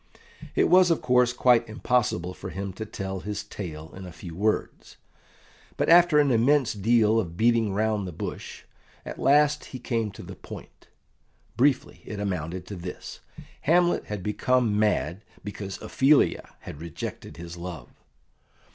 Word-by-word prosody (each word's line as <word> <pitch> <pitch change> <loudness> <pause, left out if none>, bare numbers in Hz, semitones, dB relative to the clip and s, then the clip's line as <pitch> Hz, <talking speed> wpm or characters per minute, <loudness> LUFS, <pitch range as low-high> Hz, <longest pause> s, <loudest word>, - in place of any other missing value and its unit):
It - - +4
was, 180 0 +6
of 165 - +2
course, 125 -1 +3
quite 120 -2 +3
impossible 110 -6 0
for - - -8
him 100 0 -5
to 110 +3 -6
tell 95 -2 -5
his 105 +2 -5
tale 80 -5 -8
in 95 - -9
a - - -9
few 85 0 -10
words, 105 +4 -2 0.8
but - - 0
after 170 -2 +6
an 145 -2 +4
immense 125 +3 +3
deal 110 +1 +3
of 85 -5 -4
beating 115 -2 +3
round 105 -1 0
the - - -5
bush, 80 - -7 0.4
at - - -7
last 150 +1 +3
he 130 - -8
came 115 -3 -2
to - - -10
the - - -9
point. - - -12 0.7
Briefly, 135 +2 +1
it 105 - -7
amounted 90 -2 -3
to 100 - -7
this: 90 0 -8 0.4
Hamlet 175 +3 +2
had 105 -3 -5
become 105 +1 +1
mad 105 -3 0 0.2
because 100 -1 -6
Ophelia 140 +2 +2
had 75 - -9
rejected 85 0 -7
his 85 0 -8
love. 85 -2 -8
105 Hz, 155 wpm, -26 LUFS, 95-125 Hz, 0.8 s, was